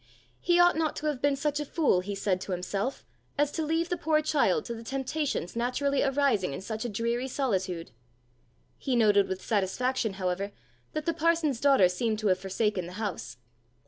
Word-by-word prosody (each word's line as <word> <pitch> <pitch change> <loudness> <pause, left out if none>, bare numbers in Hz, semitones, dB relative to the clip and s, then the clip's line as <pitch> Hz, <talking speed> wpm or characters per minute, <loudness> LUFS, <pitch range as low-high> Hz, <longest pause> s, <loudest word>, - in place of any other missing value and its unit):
He 350 0 +3
ought 350 0 +6
not 315 -1 0
to 305 - -5
have 295 -4 -1
been 285 -1 +3
such 290 +1 -1
a - - -1
fool, 295 - +2
he 200 +2 -4
said 190 -2 0
to 190 - -4
himself, 195 +8 -3 0.3
as 290 0 +2
to 320 - -2
leave 325 +2 0
the 355 - -1
poor 310 0 +2
child 285 -10 +1
to 235 - -4
the 230 - -8
temptations 265 - -2
naturally 255 +4 0
arising 270 - +1
in 135 - -5
such 220 +2 -4
a 240 - -2
dreary 235 +4 -1
solitude! 190 - -2 0.9
He 265 - -1
noted 205 -4 +4
with 190 0 -5
satisfaction, 225 +3 0
however, 190 +1 -2 0.4
that 310 -1 -3
the 335 - +1
parson's 325 -5 +1
daughter 275 -10 +6
seemed 215 +5 -1
to 215 -1 0
have 185 0 +2
forsaken 195 -1 -1
the 180 - -9
house. 160 - -5
235 Hz, 190 wpm, -28 LUFS, 195-290 Hz, 0.9 s, ought